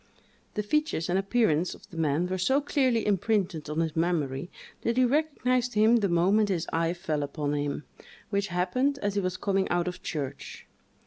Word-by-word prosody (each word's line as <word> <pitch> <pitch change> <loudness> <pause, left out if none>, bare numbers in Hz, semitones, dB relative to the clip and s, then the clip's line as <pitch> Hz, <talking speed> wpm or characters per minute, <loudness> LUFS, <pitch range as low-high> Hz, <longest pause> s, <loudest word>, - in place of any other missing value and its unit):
The 210 - -1
features 300 - 0
and 185 - +2
appearance 195 -5 +1
of - - -17
the - - -11
man 155 +1 +1
were 185 +1 -2
so 265 +10 +3
clearly 260 -5 +1
imprinted 195 -6 0
on 155 +2 0
his 160 -2 -2
memory, 160 -3 -1 0.3
that 235 +1 -1
he 255 - +5
recognised 255 -4 +1
him 220 +3 +5
the 205 -4 +1
moment 195 +5 +3
his 180 -3 0
eye 165 +1 +1
fell 160 -4 -2
upon 145 0 -2
him, 145 0 -2 0.5
which 200 0 0
happened 210 +11 0
as 205 -1 0
he 200 - 0
was 185 -1 -2
coming 195 0 0
out 175 0 +1
of 180 0 -5
church. 145 -5 -5
185 Hz, 185 wpm, -28 LUFS, 165-225 Hz, 0.5 s, he